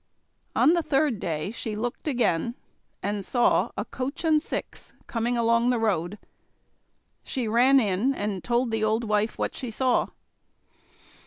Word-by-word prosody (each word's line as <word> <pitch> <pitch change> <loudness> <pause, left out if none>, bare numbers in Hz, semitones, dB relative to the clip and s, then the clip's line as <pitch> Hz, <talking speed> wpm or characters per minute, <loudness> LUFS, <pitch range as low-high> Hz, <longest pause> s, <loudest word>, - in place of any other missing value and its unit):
On 320 - +5
the 345 - +2
third 275 -6 +1
day 160 +2 -3
she 220 -2 -5
looked 240 +7 -4
again, 240 - +1 0.5
and 205 0 -2
saw 240 +4 +2
a - - -2
coach 275 +6 -5
and 310 -2 +3
six - - -6
coming 240 +1 -1
along 235 +1 +3
the 250 - +2
road. 205 -4 0 1.1
She 250 -4 -3
ran 250 +5 +5
in 210 +3 +1
and 205 -4 -3
told 240 0 +1
the 220 -1 -1
old 220 +2 +1
wife 215 0 0
what - - -2
she 250 - -5
saw. 250 +2 +1
235 Hz, 150 wpm, -26 LUFS, 210-255 Hz, 1.1 s, On